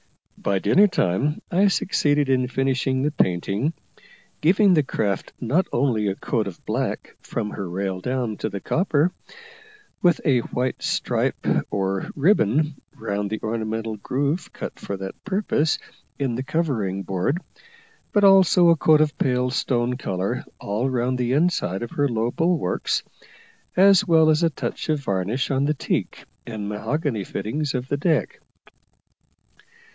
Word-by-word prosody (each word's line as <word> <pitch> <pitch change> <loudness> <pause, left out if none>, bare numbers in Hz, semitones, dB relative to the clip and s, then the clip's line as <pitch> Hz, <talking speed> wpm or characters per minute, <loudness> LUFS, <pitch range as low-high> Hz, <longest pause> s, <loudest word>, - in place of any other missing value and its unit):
By 100 -1 -1
dinner 195 - +5
time 135 - 0
I 190 +3 +4
succeeded 145 -6 +1
in 130 -1 +2
finishing 130 0 0
the 150 - +1
painting, 100 - 0 0.7
giving 190 +4 +5
the 155 - +5
craft 105 -7 -2
not 140 +10 +1
only 120 -5 +1
a 95 - -1
coat 110 0 -1
of 90 - -9
black - - -3
from 105 -3 -4
her 95 -3 -5
rail 95 +1 -3
down 125 -2 -2
to - - -3
the 100 - -5
copper, 160 - +1 0.9
with 175 -2 +4
a 130 -4 +4
white 125 +2 -3
stripe - - -1 0.2
or 95 -1 -2
ribbon 150 - +2
round 100 0 -3
the 110 - -3
ornamental 110 0 -3
groove 145 - -2
cut - - -7
for 100 - -5
that 95 0 -8
purpose 190 -6 0 0.4
in 135 -4 -1
the 120 - -2
covering 120 - -1
board, 95 - -1 0.7
but 205 - +2
also 190 -3 +6
a 165 - +6
coat 155 0 +4
of 155 -1 +1
pale 125 -1 +1
stone 125 -1 0
colour 95 -6 -2 0.2
all 110 +6 -1
round 125 0 -1
the 125 0 0
inside 140 - +1
of 120 - -6
her 145 -1 +1
low 115 0 0
bulwarks, 165 - 0 0.7
as 195 +1 +6
well 160 -2 +5
as 155 +1 +2
a 165 - +4
touch 160 - -5
of 155 -2 +1
varnish 100 +4 -1
on 135 +1 +1
the 150 +1 +1
teak - - -3 0.2
and 110 -3 -5
mahogany 115 - -2
fittings 130 - -3
of 125 0 -3
the 145 - -1
deck. 155 -1 0
130 Hz, 150 wpm, -23 LUFS, 105-155 Hz, 0.9 s, also